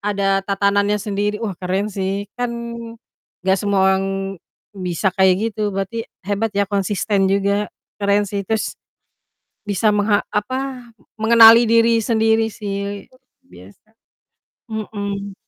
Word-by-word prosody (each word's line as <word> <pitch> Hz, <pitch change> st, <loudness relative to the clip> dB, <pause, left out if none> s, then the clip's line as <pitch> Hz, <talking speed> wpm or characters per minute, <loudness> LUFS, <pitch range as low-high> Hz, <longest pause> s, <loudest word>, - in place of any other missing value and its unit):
ada 200 Hz, -1 st, 0 dB
tatanannya 200 Hz, +1 st, +1 dB
sendiri, 205 Hz, 0 st, -2 dB
wah 215 Hz, -2 st, -3 dB
keren 190 Hz, +3 st, -2 dB
sih, 195 Hz, +1 st, -2 dB
kan 245 Hz, 0 st, -2 dB, 1.0 s
nggak 190 Hz, +1 st, +3 dB
semua 200 Hz, -1 st, +1 dB
orang 190 Hz, 0 st, 0 dB, 0.7 s
bisa 185 Hz, -1 st, -2 dB
kayak 190 Hz, +4 st, +2 dB
gitu, 210 Hz, 0 st, -1 dB
berarti 200 Hz, +4 st, -4 dB, 0.2 s
hebat 205 Hz, +3 st, -1 dB
ya, 200 Hz, -, +3 dB
konsisten 200 Hz, 0 st, 0 dB
juga, 200 Hz, +1 st, +1 dB, 0.3 s
keren 200 Hz, 0 st, +2 dB
sih, 200 Hz, 0 st, -3 dB
terus 220 Hz, -1 st, -1 dB, 1.0 s
bisa 210 Hz, +2 st, +2 dB
mengha 205 Hz, 0 st, +2 dB
apa, 255 Hz, +3 st, -3 dB, 0.3 s
mengenali 230 Hz, +1 st, +8 dB
diri 230 Hz, 0 st, +4 dB
sendiri 225 Hz, 0 st, +2 dB
sih, 200 Hz, -1 st, -5 dB
luar 255 Hz, -, -24 dB, 0.3 s
biasa, 95 Hz, -, -16 dB, 0.8 s
mhm. 200 Hz, -2 st, -5 dB
205 Hz, 120 wpm, -20 LUFS, 195-220 Hz, 1.0 s, mengenali